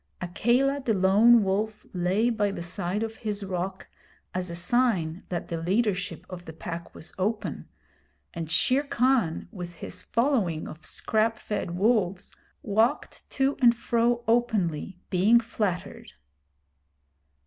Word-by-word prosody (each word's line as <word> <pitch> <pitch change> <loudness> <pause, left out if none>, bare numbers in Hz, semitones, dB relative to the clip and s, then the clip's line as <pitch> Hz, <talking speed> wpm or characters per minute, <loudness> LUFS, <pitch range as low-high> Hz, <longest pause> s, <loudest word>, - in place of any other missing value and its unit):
Akela 245 +10 +1
the 225 -4 +1
lone 210 +5 +6
wolf 210 +3 -1
lay 190 +6 +1
by 210 -3 +1
the 185 -3 -5
side 180 +4 -2
of 225 0 -5
his 210 -2 -3
rock 185 0 -4 0.5
as 185 -1 -2
a 170 - -5
sign 190 -5 +1
that 175 -2 -4
the 165 -1 -3
leadership 195 +1 0
of 180 -1 -9
the 160 - -8
Pack 165 +1 -7
was 160 - -7
open, 210 +3 -2 0.6
and 165 -2 -5
Shere 255 - +3
Khan 250 - +1
with 175 -5 -7
his - - -6
following 230 - 0
of 155 +1 -10
scrap 220 +4 +1
fed 175 -6 -4
wolves 195 -3 +1 0.3
walked 225 +6 0
to 275 +1 +1
and 240 -1 +6
fro 235 0 +1
openly 200 -8 +1
being 205 +6 +5
flattered. 215 -6 -3
205 Hz, 135 wpm, -27 LUFS, 175-235 Hz, 0.6 s, lone